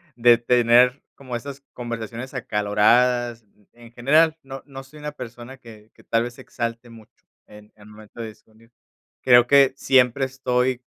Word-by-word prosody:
de 120 -1 +5
tener 120 +2 +3
como 130 -3 -8
esas 140 +3 -8
conversaciones 120 +1 -7
acaloradas. 120 +2 +1 0.3
En 120 0 -16
general, 155 +7 +2
no 135 0 -9
no 135 -2 -10
soy 150 +3 -16
una 150 0 -6
persona 125 0 -10
que 110 -3 -16
que - - -21
tal 115 0 0
vez 120 0 -7
se - - -13
exalte 115 +1 -6
mucho, 110 -2 -18 0.2
en 105 0 -16
en 105 0 -17
momento 110 +2 -13
de 115 - -5
discernir. 110 +2 -21 0.5
Creo 120 -1 +5
que 140 -1 +5
siempre 130 0 +2
estoy 125 -1 -2
120 Hz, 160 wpm, -22 LUFS, 115-130 Hz, 0.5 s, de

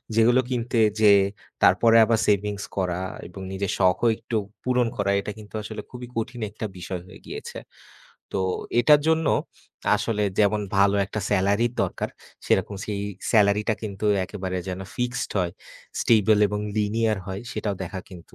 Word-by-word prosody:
যেগুলো 120 +3 +5
কিনতে 120 -1 -1 0.2
যেয়ে, 100 -2 +6 0.4
তারপরে 105 +6 +5
আবার 115 0 +2
savings 105 0 +1
করা 90 -2 0 0.3
এবং 90 +2 -10
নিজের 95 0 -2
শখও 95 +5 +3
একটু 115 - -5 0.3
পূরণ 125 -1 +2
করা, 100 -1 +1
এটা 105 - -5
কিন্তু 105 -1 -13
আসলে 110 0 -6
খুবই 125 -1 -8
কঠিন 120 +1 -3
একটা 110 - -5
বিষয় 90 0 -5
হয়ে - - -13
গিয়েছে। - - -7 0.8
তো 95 - +1 0.4
এটার 150 +3 +6
জন্য 160 -1 +2 0.7
আসলে 105 -2 -1 0.2
যেমন 105 0 +3 0.2
ভালো 100 0 +4
একটা 110 - -4
স্যালারির 100 +4 +2
দরকার, 95 - -2 0.4
সেরকম 100 - +1
সেই 105 -2 -3 0.3
স্যালারিটা 105 0 +3
কিন্তু 105 -1 -3 0.2
একেবারে 95 -2 -4
যেন 95 0 -4 0.2
fixed 125 +1 -2
হয়, 90 -1 0 0.5
stable 110 -2 +4
এবং 105 +1 -2 0.2
linear 110 +1 +1
হয় 95 +1 -5
সেটাও 105 -2 -2
দেখা 95 +2 -6
কিন্তু 90 -3 -13
105 Hz, 150 wpm, -25 LUFS, 95-115 Hz, 0.8 s, যেয়ে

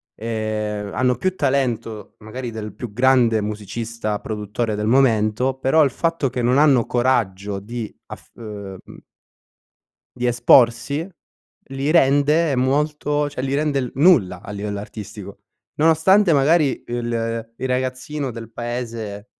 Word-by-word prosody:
ehm, 105 -2 -3
hanno 125 0 +2
più 185 +10 -1
talento 125 - -2
magari 120 +3 -6
del 105 -3 -7
più 110 0 -7
grande 125 -1 +3
musicista, 110 +1 -4
produttore, 110 +1 -3
del 105 +1 -2
momento, 120 0 +2
però 135 +4 +3
il 135 - +1
fatto 165 -3 -1
che 125 - -2
non 125 +3 +2
hanno 140 -6 +4
coraggio 105 -6 0
di 115 +2 -7
af - - -11
uhm, 100 -4 -8
mhmm - - -14 1.1
di 125 - -1
esporsi, 125 +6 +3 0.6
li 135 +2 -2
rende 145 0 +3
molto 145 +2 0
cioè 130 -3 -5
li 135 +1 -1
rende 145 -1 0
il 125 -2 -3
nulla 130 - +4
a - - -9
livello 100 0 -4
artistico. 105 -1 -9 0.4
Nonostante 165 +4 +4
magari 145 +1 +3
il- 115 -1 -2
il 130 - -3
ragazzino 130 +2 -2
del 115 0 -9
paese 115 -3 -5
120 Hz, 135 wpm, -21 LUFS, 110-140 Hz, 1.1 s, hanno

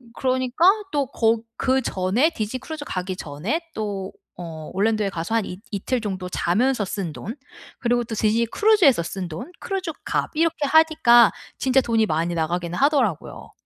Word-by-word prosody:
그러니까 255 +4 0 0.3
또 285 -3 0
거 225 0 +2 0.2
그 260 0 +2
전에 200 - +1
디즈니 225 -1 -4
크루즈 295 +2 -7
가기 185 0 -3
전에 175 - -3
또 200 -3 -4 0.3
어 160 -2 -7
올랜도에 210 +1 +1
가서 175 +5 -3
한 225 - +2 0.3
이틀 225 +5 -2
정도 190 -4 -4
자면서 215 +6 +1
쓴 185 -4 -4
돈, 215 - -7 0.4
그리고 240 -1 0
또 225 - -5
디즈니 220 +2 +2
크루즈에서 345 - +4
쓴 185 +1 -5
돈, 165 - -7
크루즈 380 -4 -3
값 - - -1
이렇게 320 -2 +1
하니까 285 -7 +5 0.2
진짜 265 0 +3
돈이 225 -2 +2
많이 165 0 -1
나가긴 170 +2 -2
하더라고요. 265 - 0
225 Hz, 330 characters per minute, -23 LUFS, 185-265 Hz, 0.4 s, 하니까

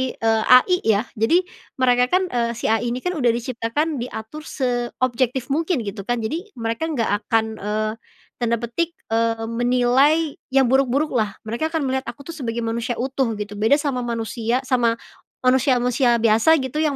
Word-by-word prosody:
eee, 225 -1 +1
AI 255 +9 +6
ya? 220 0 +2 0.2
Jadi 335 +12 +3 0.3
mereka 250 -1 +3
kan, 375 - +3
eee, 235 -1 0
si 220 - -1
AI 225 +2 +1
ini 255 - -6
kan 360 - 0
udah 280 -8 0
diciptakan 250 +5 -2
diatur 245 +5 -7
seobjektif 250 0 -1
mungkin 315 -2 0
gitu 200 -1 -6
kan 240 -2 -1
jadi 330 - -3
mereka 230 +7 -2
nggak 245 -10 -1 0.2
akan, 220 -1 0
eee, 215 +1 -1 0.5
tanda 235 -1 +1
petik, 330 +9 -2 0.2
eee, 225 0 +1
menilai 250 +6 +2
yang 265 -3 +4
buruk-buruklah 260 -5 +1
mereka 235 +9 -2
akan 320 -3 -1
melihat 265 0 -2
aku 280 +4 -10
tuh - - -10
sebagai 235 -3 -3
manusia 235 +2 -2
utuh 265 +1 -1
gitu 210 0 -6
beda 220 +6 +4
sama 275 -4 -1
manusia 230 +2 -2
sama 245 -3 +2 0.5
manusia 255 +1 +3
manusia 245 0 +2
biasa 225 +8 +5
gitu 260 +4 -3
yang 305 -3 +1
245 Hz, 165 wpm, -22 LUFS, 230-275 Hz, 0.5 s, AI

